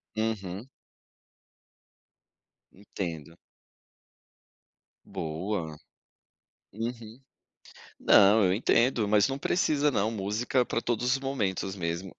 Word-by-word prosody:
Uhum. 110 0 -3 2.0
Entendo. 85 -5 -7 1.7
Boa. 80 0 -4 1.0
Uhum. 115 +2 -6 0.8
Não, 100 +1 +6
eu 90 - +3
entendo, 115 +1 +2
mas 105 +3 +4
não 135 - -3
precisa 150 -2 +1
não, 110 -3 0
música 110 +5 -1
é - - +3
para 115 - -2
todos 120 0 -2
os 135 - +2
momentos 100 -8 -2
mesmo. 85 +2 -4
105 Hz, 90 wpm, -28 LUFS, 95-120 Hz, 2.0 s, Não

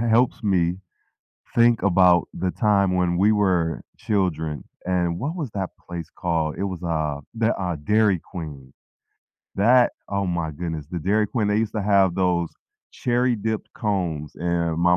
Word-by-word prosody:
helps 120 +2 +3
me, 95 -5 +2 0.9
think 120 -1 +5
about 90 -1 +5 0.2
the 95 - +1 0.2
time 100 -2 +4
when 90 -1 +2
we 105 - +5
were 90 -4 +2 0.4
children, 80 -7 0 0.4
and, 90 -1 +2
what 150 +6 -2
was 140 -8 -3
that 95 -2 -2 0.2
place 85 -2 -6
called? 80 -3 0
It 100 - -1
was, 90 - -8
uh, 80 -4 -1 0.3
the 110 - +4
uh, 90 -3 -1
Dairy 105 -3 +4
Queen. 70 -7 -8 0.8
That, 120 +5 +5 0.3
oh 100 -1 0
my 80 - -2
goodness, 80 -4 -4
the 90 - -3
Dairy 105 +2 +3
Queen, 110 -4 +1
they 105 - +2
used - - -20
to - - -1
have 95 -3 +4
those 90 -2 +1 0.5
cherry-dipped 120 -3 0 0.2
cones, 85 -8 -1
and 85 -1 -1
my 90 - +5
90 Hz, 155 wpm, -23 LUFS, 85-105 Hz, 0.9 s, think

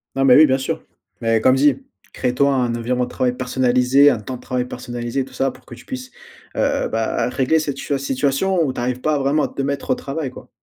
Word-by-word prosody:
Non, 135 0 +2
mais 125 -2 +7
oui, 155 - +8
bien 135 -2 +1
sûr. 130 - -3 0.4
Mais 115 -1 +2
comme 130 +3 +5
dit: 135 0 +3 0.3
«Crée-toi 130 +2 +1
un 125 -3 0
environnement 125 +2 -1
de - - -11
travail 125 -1 -1
personnalisé, 130 +2 +3
un 115 - -2
temps 125 +5 -6
de 125 - -11
travail 125 -1 -2
personnalisé» 120 +1 -4
tout 130 - -16
ça 135 +1 0
pour - - -14
que - - -12
tu 120 - -13
puisses, 260 0 -7 0.4
heu, - - +1
bah, - - -1
régler 135 +4 +1
cette 145 -3 -3
situa 140 - -1
situation 140 +7 0
où 140 - 0
tu - - -6
arrives 125 +1 -2
pas 155 +1 +1
vraiment 140 +2 +1
à - - +1
te 135 - -4
mettre 140 0 -3
au - - +3
travail, 140 +1 -4
quoi. 130 - -13
130 Hz, 235 wpm, -20 LUFS, 125-140 Hz, 0.4 s, oui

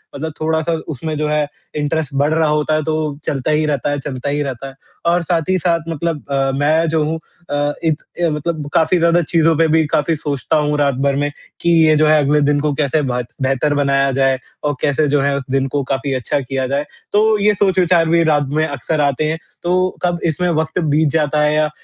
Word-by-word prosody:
मतलब 155 +2 -4
थोड़ा-सा 160 +1 0
उसमें 155 +1 -4
जो 150 - -1
है 150 0 +1 0.3
इंटरेस्ट 150 -1 -2
बढ़ 145 +3 +2
रहा 160 -1 +2
होता 150 +1 +1
है 155 - +2
तो 160 - 0 0.3
चलता 140 +1 -1
ही 155 0 +2
रहता 145 -2 -1
है 145 - -1
चलता 135 0 -4
ही 145 +1 -1
रहता 135 0 -5
है। 135 - -10 0.4
और 175 - +2
साथ 165 -1 0
ही 185 - +3
साथ 170 -2 0
मतलब 165 -1 -3
अ, 135 0 +1
मैं 155 +3 +2
जो 155 -1 +1
हूँ 155 +2 -1 0.3
अ, - - -4 0.3
एक 155 -2 0 0.3
मतलब 150 0 -3
काफ़ी 165 +3 +3
ज़्यादा 170 +1 +3
चीज़ों 165 0 +2
पे 165 0 +4
भी 160 0 +3
काफ़ी 155 +2 +2
सोचता 145 -2 -1
हूँ 150 0 0
रात 140 -2 +2
भर 140 - +2
में 145 - 0 0.3
कि 170 - +1 0.2
ये 155 - +5
जो 155 - +4
है 155 0 +5
अगले 150 +2 +2
दिन 145 0 +2
को 150 -1 +1
कैसे 150 +2 0
बहत 125 -3 -2
बेहतर 135 +2 +1
बनाया 140 -1 +2
जाए 135 0 +2 0.3
और 145 -1 0
कैसे 150 +1 +1
जो 145 0 +2
है 140 0 +1
उस 135 - -4
दिन 135 0 +1
को 140 +1 -1
काफ़ी 135 +1 -2
अच्छा 130 +2 -1
किया 130 -1 -3
जाए। 140 +2 -1 0.3
तो 215 +1 +3
ये 210 +1 +3
सोच-विचार 185 -4 +2
भी 170 0 +4
रात 150 -2 +2
में 155 +2 +1
अक्सर 145 +3 -2
आते 140 +1 +1
हैं। 160 - -1 0.3
तो 185 +1 +2
कब 175 -1 0
इसमें 170 +2 0
वक़्त 160 +1 -1
बीत 150 0 +2
जाता 150 -1 +1
है 150 0 +2
या 155 0 +2
150 Hz, 225 wpm, -18 LUFS, 140-160 Hz, 0.4 s, ये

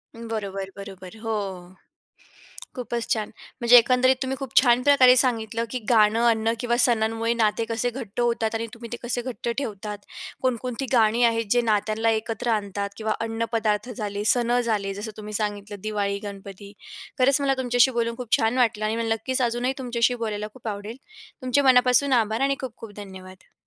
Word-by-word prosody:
बरोबर, 205 -4 -5
बरोबर. 195 -2 -10
हो, 225 0 -4 1.4
खूपच 240 -2 -4
छान! 215 -2 -3 0.3
म्हणजे 240 +1 +8
एकंदरीत 255 +2 +4
तुम्ही 265 0 -3
खूप 270 -4 -7
छान 245 -1 +4
प्रकारे 260 -3 +6
सांगितलं, 230 -3 0
की 255 - -2
गाणं, 220 -1 +4
अन्न 225 0 +1
किंवा 240 -1 0
सणांमुळे 225 -1 +1
नाते 225 -1 +1
कसे 230 +2 0
घट्ट 235 -4 -7
होतात 230 -2 0
आणि 230 +1 -2
तुम्ही 235 -1 -9
ते - - -4
कसे 240 0 -2
घट्ट 240 -1 -5
ठेवतात. 210 -5 -5 0.4
कोणकोणती 255 0 -2
गाणी 230 0 +4
आहेत, 230 -1 +1
जे 245 - +4
नात्यांना 220 0 +1
एकत्र 225 +1 -2
आणतात 200 -2 -2
किंवा 220 -1 -1
अन्नपदार्थ 225 -1 -1
झाले, 205 -1 -3
सण 245 0 +1
झाले, 210 -4 -1
जसं 210 +3 -6
तुम्ही 210 0 -8
सांगितलं, 205 -1 -4
दिवाळी, 205 -2 -1
गणपती. 200 0 -9 0.5
खरंच, 275 +2 +4
मला 275 -1 +2
तुमच्याशी 245 0 +3
बोलून 230 0 -1
खूप 245 -3 +1
छान 225 +3 0
वाटलं. 225 -4 +2
आणि 215 +1 0
मला 225 -1 0
नक्कीच 255 +4 -2
अजूनही 240 +2 0
तुमच्याशी 245 -1 +1
बोलायला 210 -1 -3
खूप 245 -3 -11
आवडेल. 210 +2 -5 0.5
तुमचे 255 +2 +2
मनापासून 260 +1 +4
आभार 220 +2 -2
आणि 275 0 +2
खूप-खूप 225 -4 -8
धन्यवाद. 190 -2 -11
230 Hz, 165 wpm, -24 LUFS, 210-245 Hz, 1.4 s, म्हणजे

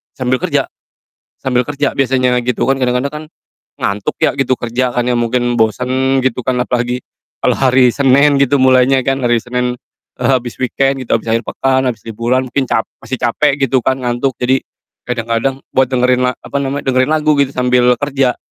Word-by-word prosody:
sambil 130 0 0
kerja - - 0 0.7
sambil 125 -1 0
kerja 145 +1 -2
biasanya 130 -2 +1
gitu 125 0 -1
kan, 135 - +3
kadang-kadang 125 +3 0
kan 155 +1 -6 0.6
ngantuk 100 0 -2
ya - - +4
gitu 135 -1 +2
kerja 120 +1 -2
kan 125 - +1
ya, 125 - +1
mungkin 120 +1 0
bosan 130 +4 +1
gitu 130 -1 0
kan, 130 - +1
apalagi 125 0 -2 0.4
kalau - - +2
hari 130 -1 +4
Senin 140 +2 +3
gitu 140 0 +2
mulainya 130 0 +4
kan, 135 +2 0
hari 120 -2 +2
Senin, 125 0 -2 0.5
eee, - - +2
habis 125 -3 0
weekend 135 +2 0
gitu, 115 - +1
habis - - -14
akhir 115 +1 +1
pekan, 130 0 0
habis 115 -3 -9
liburan 120 +4 -1
mungkin 135 +2 0
cap 110 - +1 0.2
masih 125 +3 -5
capek 135 +4 +1
gitu 130 0 +1
kan, 130 +2 0
ngantuk, 120 +2 -1
jadi 130 +1 +1 0.5
kadang-kadang 115 +2 -1 0.2
buat 130 -1 +2
dengarin 125 0 +2
la - - -4
apa - - -6
namanya, 140 +1 -3
dengarin 130 +2 +2
lagu 155 -1 +2
gitu 140 -1 +1
sambil 125 -1 +3
kerja. 135 -3 0
130 Hz, 180 wpm, -15 LUFS, 125-135 Hz, 0.7 s, ya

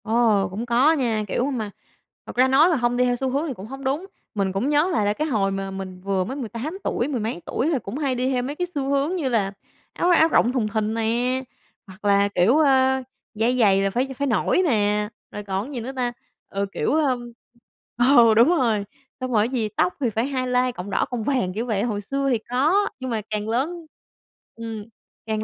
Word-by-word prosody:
Ồ, 220 -3 +3
cũng 205 +6 -5
có 245 +6 +4
nha, 235 -8 0
kiểu, 240 - 0
mà 220 -6 -3 0.5
thật - - -9
ra 255 +2 +5
nói 280 +6 +5
mà 340 - +2
hông 245 -2 0
đi 250 - +3
theo 245 0 +1
xu 265 +2 -2
hướng 280 +5 -1
thì 280 - -3
cũng 200 -2 -10
hông 270 +3 -8
đúng. 280 +7 -1 0.3
Mình 195 -2 0
cũng 200 +9 -1
nhớ 300 +4 +3
lại 215 - +1
là 205 - +2
cái 305 +8 -2
hồi 205 -8 +1
mà 195 0 -3
mình 190 -1 -7
vừa 195 -1 0
mới 255 +8 -5
18 255 - -5
tuổi, 240 - -1
mười 275 -5 -2
mấy 215 -5 -3
tuổi 280 - -1
thì 275 - +1
cũng 200 +7 -5
hay 275 -4 0
đi 250 +1 0
theo 250 -1 0
mấy 280 +3 -4
cái 355 +2 -2
xu 275 -1 -1
hướng 280 +5 +1
như 305 -8 -1
là 205 -5 0 0.4
áo 350 - +1
áo 325 -2 +6
rộng 245 -6 +3
thùng 250 -5 0
thình 215 0 -1
nè, 240 +3 0 0.4
hoặc 190 +2 -13
là, 200 0 +4
kiểu, 195 +11 +4
ơ, 265 -3 +3 0.3
dây 235 +3 +1
giày 195 -5 +4
là 195 - +1
phải 250 +7 -1
phải 280 - 0
nổi 235 - +2
nè, 210 -4 +1 0.2
rồi 210 - -6
còn 195 +1 -2
cái - - -9
gì 250 - -3
nữa 250 +4 -5
ta? 245 -2 -1 0.4
Ừ, 200 0 -1
kiểu, - - -1
ưm, 255 -6 0 0.7
ừ, 240 -2 +6
đúng 230 +7 +5
rồi, 235 -11 +2 0.3
xong 255 -1 -3
rồi 215 -1 +3
cái - - -9
gì 230 -5 -1
tóc 180 -4 0
thì 255 - +1
phải 225 +2 -1
highlight 255 -2 0
cọng 180 +3 -6
đỏ, - - +1
cọng 240 -3 -2
vàng 245 -8 0
kiểu 225 +5 -3
vậy. 215 -4 0
Hồi 215 -4 -2
xưa 275 +6 -1
thì 240 - +3
có, 310 +12 +2
nhưng 260 -1 -4
mà 225 -2 -1
càng 210 0 -3
lớn, 315 +9 -2 0.7
ừm, 225 -2 -6 0.4
càng 215 -1 -2
240 Hz, 235 wpm, -23 LUFS, 210-270 Hz, 0.7 s, áo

